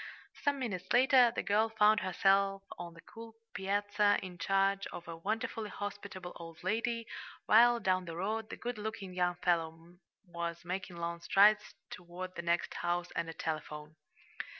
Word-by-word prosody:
Some 285 -1 +1
minutes 190 -8 -4
later 255 0 +6
the - - -1
girl 215 +2 +2
found 215 -1 +4
herself 195 +1 +2 0.2
on 170 -1 -7
the 165 - -13
cool 225 0 -12 0.2
piazza, 205 +1 +1
in 180 -2 -8
charge 195 +2 +1
of 175 - -9
a 165 - -6
wonderfully 215 +4 -3
hospitable 205 -3 -6
old 165 -1 -11
lady, 230 +4 -1 0.4
while 240 +2 +6
down 185 -3 +1
the 165 -1 -6
road 215 +5 -2
the - - -7
good 240 -2 -5
looking 205 -3 -5
young 180 -1 +1
fellow 165 0 -1 0.3
was 170 -1 -5
making 185 0 -4
long 170 0 -4
strides 210 +3 +4 0.2
toward 180 +1 -7
the - - -4
next 170 0 0
house 175 0 -1
and 170 -1 -2
a - - -6
telephone. 155 -1 -5
190 Hz, 160 wpm, -33 LUFS, 175-215 Hz, 0.4 s, later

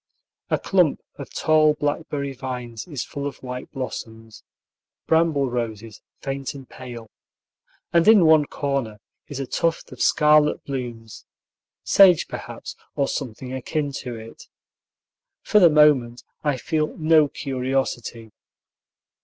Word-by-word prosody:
A - - +2
clump - - +2 0.2
of - - -8
tall 155 -1 +3
blackberry 145 -1 -2
vines 125 -2 -6
is 145 -7 -4
full 140 0 -5
of 140 - -9
white 125 0 -6
blossoms, 115 -4 -7 0.6
"bramble 160 -4 +2
roses 115 -3 -5 0.2
faint 135 0 -4
and 135 -2 -10
pale," 120 -3 -10 0.9
and 170 +2 +4
in 215 -6 +7
one 155 -2 +6
corner 140 -8 -3 0.3
is 145 -2 -6
a 135 - -2
tuft 165 +6 -1
of - - -9
scarlet 150 -1 +4
blooms, 120 -5 -6 0.6
sage, 185 -4 +6
perhaps, - - -8 0.2
or 140 - +1
something 130 -1 -5
akin 145 +3 -2
to 125 -3 -6
it. 110 0 -11 1.0
For 210 - +4
the 175 -4 +7
moment 145 -6 +4 0.2
I 145 -3 +1
feel 155 +4 -2
no 155 -1 +4
curiosity. 130 -5 -3
135 Hz, 125 wpm, -23 LUFS, 120-150 Hz, 1.0 s, in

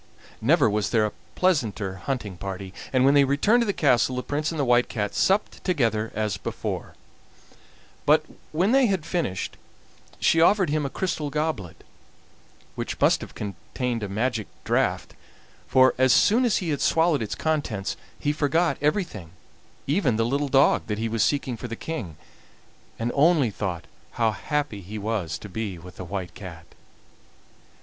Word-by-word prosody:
Never - - +4
was 105 -1 0
there 110 -3 +3
a 105 - -2 0.2
pleasanter 110 - 0
hunting 105 -2 -4
party, 95 +1 -6 0.2
and 130 -1 +3
when 140 - +6
they 145 -1 +6
returned 145 - +3
to 235 - 0
the - - +2
castle 130 - +2
the 125 - -3
Prince 150 +1 -1
and 160 - -4
the 140 - +2
White 125 0 +3
Cat 105 -3 -2
supped 195 +2 +1
together 115 - 0
as 105 -3 -1
before, - - -5 1.1
but - - +5 0.3
when 180 +7 +2
they 265 -1 +5
had 190 -6 -1
finished 160 - -2 0.6
she 165 - +3
offered 190 -1 +4
him 150 -2 0
a - - -6
crystal 160 -3 -2
goblet, 150 - -3 0.9
which - - -5
must - - +4
have - - -9
contained 115 +4 -4
a 105 - -4
magic 110 +1 -1 0.2
draught, - - 0 0.5
for, 130 0 +5
as 130 0 +5
soon 225 - +4
as 235 - +2
he 180 - -2
had 145 - -2
swallowed 160 -4 +3
its 110 - -3
contents, 145 -11 -1 0.2
he 145 - 0
forgot 155 +1 +1
everything, 150 - -1 0.6
even 140 - +1
the 115 +1 +1
little 140 +4 0
dog 135 +1 +4
that 105 -1 -2
he 115 +1 -1
was 115 -1 -1
seeking 140 -4 0
for 120 - -7
the 115 - -5
King, 110 - -6 0.8
and 115 +1 -1
only 145 -5 +4
thought 90 -4 -4 0.3
how 115 -2 +2
happy 145 -2 -2
he 100 +4 -7
was 100 -7 -2
to - - -9
be 100 -1 -4
with 90 0 -13
the - - -6
White 95 -1 -5
Cat! 85 -5 -10
125 Hz, 170 wpm, -25 LUFS, 105-155 Hz, 1.1 s, when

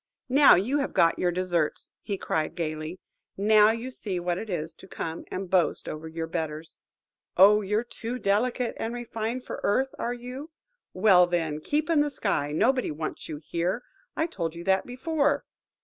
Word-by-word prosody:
"Now 280 +2 +7
you 245 +11 +1
have 275 - -2
got 165 0 +4
your 180 - +2
deserts," 175 -3 -1 0.3
cried 155 -1 0
he, - - -25
gaily. 155 +1 -4 0.4
"Now 210 +1 +6
you 230 +3 -2
see 195 -7 -3
what 175 0 -1
it 220 - -7
is 165 -3 -3
to - - -14
come 165 -2 -5
and 190 0 -4
boast 180 -3 +1
over 155 +1 -6
your 160 0 -4
betters. 160 -1 -5 0.6
Oh, 205 +3 +7
you're 210 +3 0
too 240 0 -6
delicate 235 +3 0
and 230 +2 -3
refined 235 +1 -4
for - - -6
earth, 265 +6 +1
are 240 +1 -2
you? 250 +5 -8 0.5
Well, 180 -4 +6
then, 165 -4 -1
keep 295 - 0
in 330 -3 +3
the 295 - +1
sky. 195 - -1
Nobody 255 - +2
wants 155 +2 -5
you 155 - -4
here–I 250 - -3
told 170 - -4
you 170 - -7
that 190 +1 +1
before. 285 +2 0
200 Hz, 175 wpm, -27 LUFS, 170-250 Hz, 0.6 s, Now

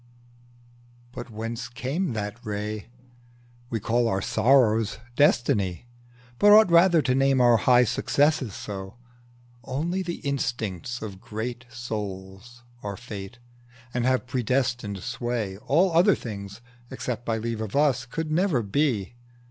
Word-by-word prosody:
But 125 - -8
whence 115 +2 -5
came 130 +7 -3
that 105 +2 -5
ray? 105 -1 -4 0.8
We 115 - -2
call 120 +3 +1
our 95 -4 0
sorrows 110 0 +3 0.2
Destiny, 115 -9 +2 0.5
but 205 - +6
ought 210 -3 +7
Rather 170 -2 +6
to 125 - +1
name 135 0 +3
our 120 -2 +6
high 125 +3 +5
successes 140 0 +1
so. 95 +1 -7 0.7
Only 165 +10 -2
the 170 -2 -3
instincts 120 -5 -3
of 100 -3 -7
great 120 +3 -5
souls 105 0 -7 0.2
are 100 -1 -5
Fate, 110 -2 -8 0.6
And 125 - 0
have 130 0 +1
predestined 120 -5 -1
sway: 120 -5 -3
all 175 - +2
other 175 +5 +5
things, 100 -1 -8 0.3
Except 120 -2 -4
by 115 -2 -1
leave 115 0 -3
of 110 +1 -5
us, 135 -5 +2
could 155 +4 -4
never 165 - +2
be. 115 -1 0
120 Hz, 130 wpm, -25 LUFS, 105-135 Hz, 0.8 s, ought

